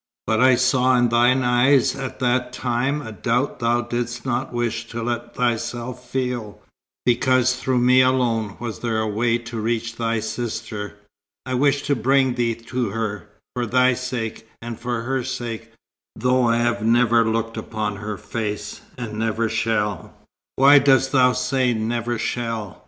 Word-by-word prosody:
But 110 0 +1
I 130 0 +6
saw 130 0 +3
in 120 -1 +3
thine 120 +3 +3
eyes 125 +2 +3
at 135 -2 -6
that 125 0 +1
time 130 +4 -1
a 110 - -7
doubt 120 +5 -1
thou 120 0 +1
didst 120 +1 -4
not 130 +1 -2
wish 120 -1 -2
to 115 +1 -5
let 120 0 -4
thyself 120 +1 -2
feel, 125 -5 -3 0.5
because 125 +1 +3
through 130 0 -1
me 125 +1 +5
alone 120 -5 +1
was 115 -5 -5
there 115 -2 -1
a 110 - 0
way 115 +3 +1
to 115 -1 -7
reach 115 0 -2
thy 115 -1 0
sister. 110 -3 -5 0.5
I 130 - -3
wished 140 +2 +2
to 140 0 +1
bring 130 +2 +2
thee 120 -2 0
to 115 0 -3
her, 105 -1 -4 0.2
for 125 -2 -2
thy 125 +2 +4
sake, 120 -3 -5
and 115 -1 -7
for 120 -1 -3
her 130 +1 -1
sake, 120 -3 -5 0.4
though 125 +2 +2
I 115 0 +3
have 120 -1 0
never 115 0 +4
looked 115 0 -1
upon 110 -2 -4
her 105 0 -5
face 105 -2 -5 0.2
and 110 -3 -5
never 115 0 0
shall 105 -2 -1 0.2
" 105 0 -70
"Why 140 +2 +7
dost 135 -1 +3
thou 125 -2 +4
say 125 -1 +1
'never 120 +2 -2
shall'?" 115 -4 -3
120 Hz, 165 wpm, -22 LUFS, 115-125 Hz, 0.5 s, Why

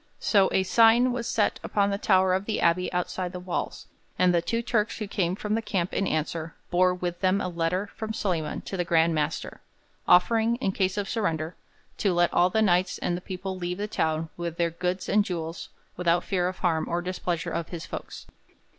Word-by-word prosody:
So 195 -3 +3
a 190 - +2
'sign' 230 +5 +5
was 240 -1 -3
set 215 -3 +1
upon 200 -1 +1
the 200 - -2
tower 190 -2 +3
of 190 +2 0
the 220 - -1
abbey 180 +2 +2
outside 180 0 -2
the 180 - -5
walls, 180 -1 -4 0.3
and 180 -1 +4
the 170 - +3
two 230 +7 -1
Turks 215 -2 0
who 215 - -4
came 185 -3 0
from 210 +1 -3
the 225 - +1
camp 195 -5 -2
in 195 - 0
answer 160 +1 -2 0.2
bore 185 +1 +4
with 180 -1 -3
them 190 +1 +3
a 185 - -2
letter 175 +2 -1
from 220 0 -5
Solyman 175 -8 -2
to - - -6
the 175 - +1
Grand 165 -1 +3
Master, 150 -2 -2 0.5
offering, 225 +5 +4
in 240 -6 -1
case 190 0 0
of 205 -1 -1
surrender, 165 -7 -2 0.4
to 195 -3 +2
let 175 0 +2
all 180 +1 +4
the 220 +4 +2
Knights 180 -2 +2
and 175 - -1
the 175 - -5
people 190 +1 -5
leave 180 0 -3
the 205 +1 -3
town 160 -4 -1
with 170 -1 -4
their 170 -1 +1
'goods 180 +2 -2
and 210 0 +3
jewels 165 -3 -5 0.3
without 175 0 +2
fear 180 -3 0
of 185 - -4
harm 165 -3 0
or 175 +1 -1
displeasure 180 -2 -3
of 170 - -3
his 170 -2 -6
folks. - - -8
180 Hz, 210 wpm, -26 LUFS, 170-200 Hz, 0.5 s, sign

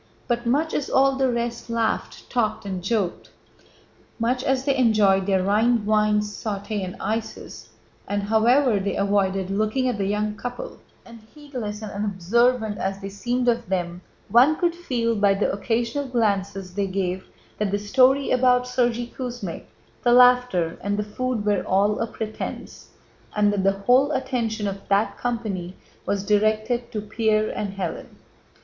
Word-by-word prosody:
But 240 -1 -1
much 300 +6 +1
as 285 - -2
all 270 0 +3
the 265 -1 +1
rest 235 0 -3
laughed, 230 -1 -2
talked, 225 -4 -1
and 190 -3 -4
joked, 195 -3 -1 0.9
much 250 +2 0
as 265 0 0
they 275 -2 +2
enjoyed 210 -6 +3
their 190 -2 +2
Rhine 215 +3 +2
wine, 210 0 +3
sauté, 210 0 -4
and 180 -1 -5
ices, 220 +1 -5 0.4
and 205 0 -1
however 225 +2 +3
they 200 +1 -2
avoided 195 -1 0
looking 215 +6 0
at 240 -5 -1
the 195 - 0
young 210 +1 -1
couple, 245 +2 -7 0.3
and 230 -1 -12 0.2
heedless 245 -8 -6
and 215 - -6
unobservant 210 +3 +1
as 195 0 -2
they 195 0 -6
seemed 245 +5 -2
of 235 -2 +1
them, 175 -2 -2 0.3
one 250 +9 +5
could 345 +1 +1
feel 245 -10 -1
by 200 -1 +3
the 200 - 0
occasional 235 +6 -1
glances 200 -6 -1
they 200 +1 -1
gave 185 -1 -2 0.3
that 210 -1 0
the 200 - 0
story 260 +6 +3
about 250 0 +4
Sergéy 245 -1 -1
Kuzmích, 240 -9 -6 0.4
the 240 - +3
laughter, 250 -9 +4
and 205 +1 -1
the 210 - 0
food 225 +1 -3
were 205 -3 +2
all 200 +2 +1
a 230 - -1
pretense, 215 -1 -7 0.5
and 205 -1 +3
that 195 -2 -1
the 195 0 +3
whole 265 +4 +4
attention 235 -6 -1
of 195 0 -4
that 200 +2 +2
company 210 -7 -3 0.3
was 200 -1 0
directed 215 +3 +1
to—Pierre 215 0 0
and 200 -2 -4
Hélène. 180 -4 -5
215 Hz, 155 wpm, -23 LUFS, 200-245 Hz, 0.9 s, one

